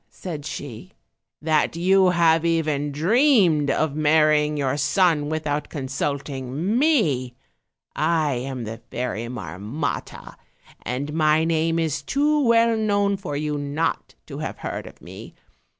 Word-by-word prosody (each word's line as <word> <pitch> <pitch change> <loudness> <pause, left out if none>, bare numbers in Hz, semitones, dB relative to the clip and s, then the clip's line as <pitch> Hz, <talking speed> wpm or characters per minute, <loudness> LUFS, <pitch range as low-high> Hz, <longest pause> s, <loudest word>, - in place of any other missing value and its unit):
said 155 -5 -7
she, 145 - -8 0.5
"that 155 0 +1
you 185 +2 +4
have 165 -2 +3
even 155 -3 0
dreamed 180 - +3
of 155 -2 0
marrying 150 0 +3
your 140 -1 0
son 150 0 +2
without 150 -2 -2
consulting 140 - -3
me; 155 - +1 0.6
I 155 -2 +1
am 130 0 -4
the 115 +1 -6
Fairy 120 -2 -3
Marmotta, 105 - -5 0.4
and 135 +5 -4
my 155 0 +3
name 165 0 +1
is 160 -2 -1
too 295 +1 +1
well 230 -1 +4
known 205 -2 +1
for 180 -7 -5
you 150 0 -2
not 145 +3 -2
to - - -8
have - - -5
heard - - -5
of - - -15
me. - - -11
155 Hz, 130 wpm, -23 LUFS, 140-170 Hz, 0.6 s, you